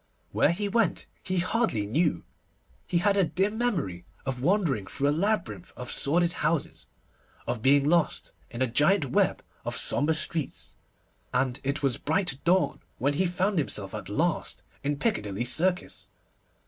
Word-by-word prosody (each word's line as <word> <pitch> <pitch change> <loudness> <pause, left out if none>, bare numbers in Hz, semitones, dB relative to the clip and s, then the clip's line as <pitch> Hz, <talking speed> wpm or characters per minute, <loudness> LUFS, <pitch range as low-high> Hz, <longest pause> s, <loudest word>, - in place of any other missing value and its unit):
Where - - +3
he 205 +4 -2
went 215 -2 +1 0.2
he 185 0 -2
hardly 185 - +1
knew. 155 +10 +1 0.6
He 175 - +1
had 200 +3 +3
a 195 - +4
dim 195 +5 0
memory 155 - -1 0.2
of 130 -2 -3
wandering 155 - +1
through 140 +7 0
a - - +3
labyrinth 195 +1 -1
of 125 0 -4
sordid 170 +4 +2
houses, 155 0 -1 0.6
of 120 -2 -3
being 140 +3 +4
lost 170 0 +1 0.2
in 120 +2 -2
a - - +1
giant 145 - +2
web - - +2 0.2
of - - -2
sombre 155 +3 +2
streets, 155 -1 -2 0.6
and 125 +1 0
it 140 +2 -2
was 135 -3 +1
bright 160 -3 -1
dawn 185 +2 +2 0.2
when 140 +3 +1
he 185 +6 +1
found 185 +2 0
himself 105 -9 -3
at - - -6
last - - -1 0.2
in 145 +1 -1
Piccadilly 105 - -1
Circus. 180 +9 0
155 Hz, 155 wpm, -27 LUFS, 135-185 Hz, 0.6 s, a